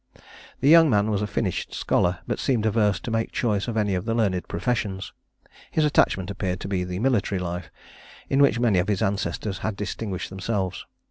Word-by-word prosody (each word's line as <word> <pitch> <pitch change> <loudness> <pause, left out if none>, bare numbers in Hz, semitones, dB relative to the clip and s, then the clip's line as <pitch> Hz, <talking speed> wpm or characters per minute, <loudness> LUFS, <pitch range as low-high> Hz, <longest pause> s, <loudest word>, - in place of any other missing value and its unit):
The 135 - +2
young 165 +1 +8
man 105 -2 +2
was 100 -1 0
a 105 - -1
finished 100 -3 -2
scholar, 90 0 +1
but - - -3
seemed 120 -6 +1
averse 105 -3 +2
to 115 - -5
make 115 0 -1
choice 105 -3 0
of 115 -2 -2
any 105 -2 +1
of 90 +2 -2
the 115 0 0
learned 95 -6 0
professions. 95 0 -2 0.6
His 155 - +1
attachment 100 -9 +2
appeared 95 -2 -3
to - - -5
be 95 -2 -1
to 90 - -3
the 90 0 -4
military 110 -4 +1
life, 90 -1 -4 0.6
in 135 +1 +2
which 140 -4 +4
many 115 -6 +3
of 90 - 0
his 105 -3 0
ancestors 95 0 -2
had 110 - -2
distinguished 100 -2 -4
themselves. 95 -1 -3
100 Hz, 200 wpm, -25 LUFS, 95-115 Hz, 0.6 s, young